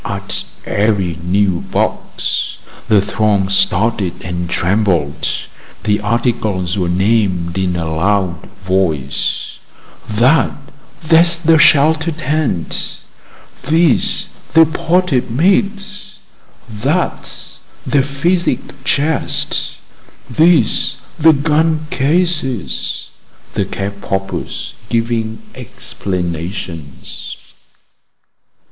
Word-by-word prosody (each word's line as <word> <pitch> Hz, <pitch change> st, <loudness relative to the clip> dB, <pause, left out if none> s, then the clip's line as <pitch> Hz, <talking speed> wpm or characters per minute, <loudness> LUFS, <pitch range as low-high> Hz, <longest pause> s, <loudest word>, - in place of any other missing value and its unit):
At -, -, -3 dB, 0.2 s
every 100 Hz, -5 st, 0 dB
new 95 Hz, 0 st, +1 dB
box -, -, -2 dB, 0.3 s
the 105 Hz, -2 st, +5 dB
throng 100 Hz, -2 st, +1 dB
started 100 Hz, 0 st, +1 dB
and 85 Hz, -1 st, -4 dB
trembled. 85 Hz, -6 st, +1 dB, 0.6 s
The 105 Hz, 0 st, +1 dB
articles 105 Hz, -5 st, 0 dB
were 90 Hz, -3 st, 0 dB
named 95 Hz, -3 st, +1 dB
in 95 Hz, -2 st, 0 dB
a 85 Hz, -1 st, -2 dB
loud 85 Hz, +2 st, 0 dB, 0.2 s
voice: 85 Hz, -8 st, -1 dB, 0.5 s
"That 120 Hz, +9 st, +3 dB, 0.5 s
there's 170 Hz, +1 st, +5 dB
the 165 Hz, -1 st, +4 dB
shelter 160 Hz, +1 st, +5 dB
tent; 150 Hz, -, -2 dB, 0.7 s
these 160 Hz, -1 st, +3 dB, 0.3 s
the 165 Hz, 0 st, +8 dB
potted 165 Hz, -4 st, +1 dB
meats; 200 Hz, -, 0 dB, 0.5 s
that's 135 Hz, +11 st, -2 dB, 0.3 s
the 140 Hz, -, +3 dB
physic 140 Hz, 0 st, -1 dB
chest; 145 Hz, +2 st, 0 dB, 0.5 s
these 160 Hz, +7 st, +3 dB, 0.2 s
the 160 Hz, +1 st, +7 dB
gun 155 Hz, +2 st, +1 dB
cases," 150 Hz, -, -1 dB, 0.4 s
the -, -, 0 dB
cap 100 Hz, 0 st, -5 dB
poppers 95 Hz, -1 st, -4 dB, 0.2 s
giving 115 Hz, -, -1 dB
explanations. 85 Hz, -, -5 dB
110 Hz, 80 wpm, -16 LUFS, 95-155 Hz, 0.7 s, the